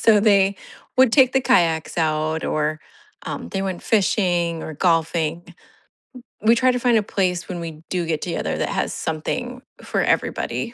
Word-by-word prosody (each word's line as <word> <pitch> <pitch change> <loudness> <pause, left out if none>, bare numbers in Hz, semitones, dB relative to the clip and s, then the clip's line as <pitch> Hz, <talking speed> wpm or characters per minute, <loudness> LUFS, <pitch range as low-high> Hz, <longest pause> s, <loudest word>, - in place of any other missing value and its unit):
So, 215 -2 +5
they 200 -2 +3 0.4
would 260 -3 +5
take 260 -3 +5
the 265 - +3
kayaks 165 -7 +1
out 155 0 0
or, 155 0 -1 0.5
um, 85 - -5
they 195 - -2
went 190 -2 -4
fishing 175 -6 +1
or 155 - -7
golfing. 165 0 0 0.9
We 225 +2 +5
try 255 +2 +3
to 250 - -2
find 240 -2 +3
a 215 - +1
place 180 -3 -1
when 180 -2 -5
we 160 -2 -7
do 180 -2 -1
get 160 -2 -2
together 175 - -3
that - - -1
has - - -2
something 245 +11 -4 0.2
for - - -1
everybody. 235 +1 -1
180 Hz, 170 wpm, -22 LUFS, 160-220 Hz, 0.9 s, So